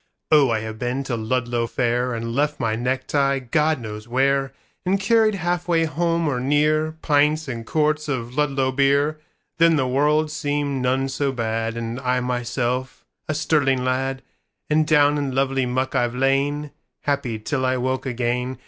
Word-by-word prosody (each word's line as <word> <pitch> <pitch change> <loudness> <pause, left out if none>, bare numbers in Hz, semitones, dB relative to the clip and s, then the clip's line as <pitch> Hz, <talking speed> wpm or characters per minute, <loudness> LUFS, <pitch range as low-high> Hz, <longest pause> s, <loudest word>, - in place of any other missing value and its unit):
Oh 145 -4 +6
I 110 -2 0
have 110 0 -6
been 125 +2 -2
to 130 -3 -3
Ludlow 120 +1 -1
fairAnd 120 -1 -1
left 145 +3 0
my 115 -3 0
necktie 130 +3 0
God 150 +4 +1
knows 105 -1 -7
where, 135 +2 +1 0.3
And 190 +2 +1
carried 220 +1 +3
half 175 -1 -2
way 165 -2 +2
home, 165 +1 0
or 130 -4 0
near, 150 +4 +1
Pints 150 +1 +2
and 115 -3 -5
quarts 150 0 +1
of 125 -3 -3
Ludlow 135 -3 +1
beer:Then 150 +4 +1
the 135 -4 +1
world 150 +4 +2
seemed 145 -3 -2
none 130 +2 +1
so 135 +1 -1
bad, 115 -2 -2
And 115 +1 -4
I 125 0 0
myself 125 +1 -2 0.2
a 155 - 0
sterling 145 -4 +1
lad; 135 +1 -1 0.5
And 155 0 +3
down 145 -1 +4
in 135 -3 -3
lovely 135 -1 +1
muck 130 +2 -1
I've 120 0 0
lain, 140 +3 0 0.3
Happy 140 -6 -1
till 130 +5 -2
I 130 0 +1
woke 130 +1 -2
again. 125 +1 -2
135 Hz, 160 wpm, -22 LUFS, 125-150 Hz, 0.5 s, Oh